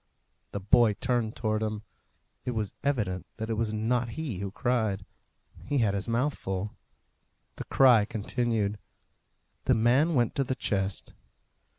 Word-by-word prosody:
The 100 - -3
boy 105 +3 +4
turned 120 0 -1
towards 110 -1 0
him. 110 -1 -3 0.6
It 125 - -3
was 105 -3 -2
evident 105 -10 -1
that 110 0 -3
it - - +2
was 110 0 0
not 115 +3 0
he 140 - -3
who 100 0 -3
cried. 110 -3 0 0.6
He 145 - -1
had 110 -6 +2
his 100 +2 -2
mouth 125 +6 +1
full. 95 +2 -4 0.8
The - - -5
cry 125 -6 +6
continued. 110 -1 -1 0.9
The - - +4
man 130 +9 +3
went 120 -3 +2
to 140 - +3
the 130 0 -2
chest. 95 -5 -2
110 Hz, 150 wpm, -28 LUFS, 105-125 Hz, 0.9 s, cry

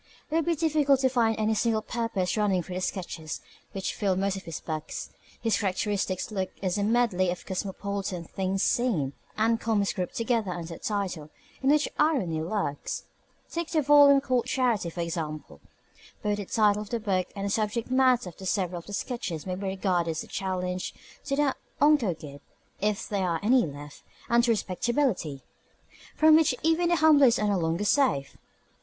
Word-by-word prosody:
It - - 0
would 330 - +2
be 340 -1 +2
difficult 295 -3 +3
to 260 - +4
find 230 -3 +2
any 215 0 +1
single 220 0 +1
purpose 225 -7 -1
running 200 -4 +1
through 185 - -8
the 185 - -3
sketches 165 -5 -4 0.3
which 195 -1 -3
fill 195 -2 0
most 195 +1 0
of 190 - -8
his 165 -3 -5
books. 155 -2 -5 0.3
His 225 -2 +1
characteristic 195 -1 -1
book 190 -3 -2
is 190 +1 -1
a - - +1
medley 215 -5 +2
of 175 0 -4
cosmopolitan 195 -1 -3
"things 190 +3 -2
seen" 185 - +1 0.2
and 225 +1 +2
comments 210 -3 +1
grouped 185 -3 -4
together 230 -3 0
under 170 -1 -6
a - - -10
title 185 -7 -3 0.3
in 270 - +2
which 300 +1 +4
irony 240 - +2
lurks. 165 -4 -3 0.5
Take 335 -1 -3
the 310 -3 +1
volume 285 -1 +7
called 255 -3 0
Charity, 245 -9 +1
for 170 +1 -5
example. 160 -3 -5 0.6
Both 210 -1 0
the 205 - -4
title 210 0 +2
of 210 - -8
the 235 - -1
book 190 -4 0
and 200 0 -3
the 200 - -1
subject 220 +3 -1
matter 255 -6 +3
of 190 - -7
several 180 -3 -1
of 170 - -15
the 205 - -8
sketches 195 -8 -4
may 185 - -3
be 195 +2 -4
regarded 185 -3 0
as 160 -1 -2
a - - -13
challenge 180 -1 -3 0.3
to 275 - 0
the 285 -1 +2 0.2
unco' 285 - +4
guid 145 -2 -11 0.4
(if 210 +2 -1
there 195 -4 -1
are 165 -1 0
any 240 -2 +4
left) 145 0 -10 0.3
and 235 +1 +4
to - - 0
respectability 205 - 0 0.7
(from 315 0 +6
which 310 -5 +4
even 325 +2 +3
the 345 - +4
humblest 295 -6 +6
are 210 -1 +1
no 200 -2 +1
longer 165 +4 -1
safe). 205 - +2
205 Hz, 185 wpm, -27 LUFS, 180-245 Hz, 0.7 s, volume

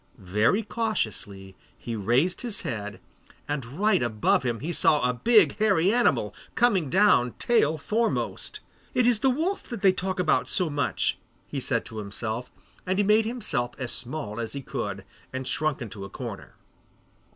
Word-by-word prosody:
Very 105 - +1
cautiously 105 - -3 0.2
he 115 - -5
raised 125 - +1
his 230 -5 -3
head, 105 -4 -5 0.5
and 145 -2 -2
right 190 - +1
above 110 -1 +2
him 120 -3 -2
he 165 +5 -3
saw 150 -5 +4
a 125 - +1
big 220 - +4
hairy 200 -3 +3
animal, 245 0 +2 0.2
coming 195 - +3
down 180 - +4
tail 160 -10 +2
foremost. 220 +9 -1 0.3
'It 250 -1 +3
is 240 -3 +4
the 265 - +3
wolf 330 +10 0
that 235 -5 -7
they 195 - +7
talk 185 0 -2 0.3
so 180 -5 +1
much 145 -2 +1
about,' - - -15 0.3
he - - -3
said - - 0
to 110 - -7
himself, 110 +4 -4 0.3
and 185 +1 -1
he 205 - +3
made 215 +2 +4
himself 165 - -2
as 125 -2 -3
small 125 -4 -4
as 115 -2 -3
he 140 - -5
could 100 -8 -4 0.3
and 130 0 -4
shrunk 155 -3 0
into 100 -3 -8
a 100 - -7
corner. - - -8
145 Hz, 165 wpm, -26 LUFS, -, 0.5 s, they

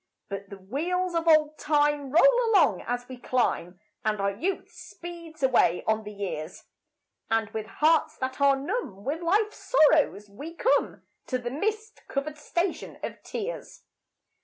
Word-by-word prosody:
But 200 -1 -6
the 200 - -9
wheels 345 - -2
of 335 0 -1
old 310 -1 +4
Time 295 -2 +2
roll 475 - +6
along 340 - +4
as 245 +1 -2
we 255 - -8
climb, 190 -8 -1 0.2
And 215 -1 0
our 200 0 +1
youth 345 - -3
speeds 335 -3 -10
away 240 -9 +3
on 220 0 +1
the 210 - -6
years; 185 -5 -5 0.7
And 225 -1 +1
with 220 -1 -4
hearts 310 +7 +2
that 260 +2 -4
are 280 -1 +6
numb 270 - -4
with 300 +5 -2
life's 415 +5 +1
sorrows 300 - +3
we 290 +12 -9
come - - +1 0.2
To 255 - 0
the 240 -1 -5
mist 435 - -3
covered 295 +2 -3
Station 345 +4 -2
of - - -5
Tears. 465 +3 -6
285 Hz, 155 wpm, -27 LUFS, 220-340 Hz, 0.7 s, roll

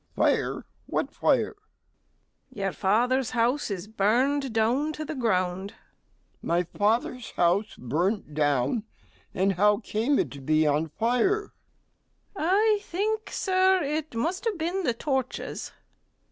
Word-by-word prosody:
MR. - - -44 0.2
G. - - +5
Fire! - - 0 0.2
what - - -1
fire? - - +3
STEWARD. 430 - -8 1.0
Your 195 -3 -1
father's 240 +7 +1
house 245 +4 +1
is 195 -1 -4
burned 250 +6 +1
down 240 +8 +1
to 310 0 -5
the 310 - -4
ground. 190 -6 -1
MR. - - -23
G. - - -26 0.7
My 170 +1 +2
father's 225 +7 -1
house 180 +5 +1
burnt 165 - -1
down! 145 - +1 0.5
and 195 +2 +2
how 205 +3 +4
came 230 +5 0
it - - 0
to 140 - -9
be 155 +3 +2
on 150 +2 +1
fire? 250 - 0 0.8
STEWARD. 340 -4 -2
I 425 +1 +4
think, 430 +4 -2
Sir, 375 -1 +2
it 300 -1 -3
must 335 - -2
have 440 -5 0
been 345 +4 -1
the 245 -10 0
torches. 265 0 -3
230 Hz, 145 wpm, -27 LUFS, 190-310 Hz, 1.0 s, G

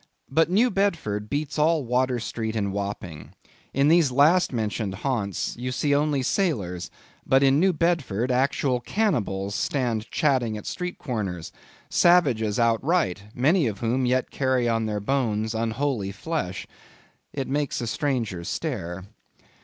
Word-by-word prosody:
But 160 +4 +3
New 225 +7 +3
Bedford 160 - -1
beats 150 +1 -2
all 155 -2 +3
Water 125 +1 +1
Street 110 -1 -4
and 100 -3 -1
Wapping. 100 -6 -5 0.4
In 140 +2 +2
these 160 -3 +4
last 155 +8 +4
mentioned 110 -4 -2
haunts 105 -4 -2
you 125 +1 -3
see 145 +2 0
only 145 -2 +1
sailors; 100 - -1 0.3
but 135 +1 +3
in 135 +1 +4
New 190 +3 +4
Bedford, 150 - 0
actual 130 0 +1
cannibals 115 - -1
stand 120 -2 -1
chatting 130 -8 +1
at 105 - -9
street 180 -1 -4
corners; 95 - -4 0.4
savages 130 -12 +3
outright; 115 - +1
many 150 +4 +3
of 105 -3 -4
whom 125 +2 +1
yet 130 0 0
carry 130 -3 +1
on 115 -1 0
their 105 -1 -2
bones 110 -2 0
unholy 115 -1 -1
flesh. 100 - -4 0.7
It 135 -2 -4
makes 145 0 -1
a 120 - -3
stranger 115 - -2
stare. 95 - -4
125 Hz, 140 wpm, -25 LUFS, 105-145 Hz, 0.7 s, these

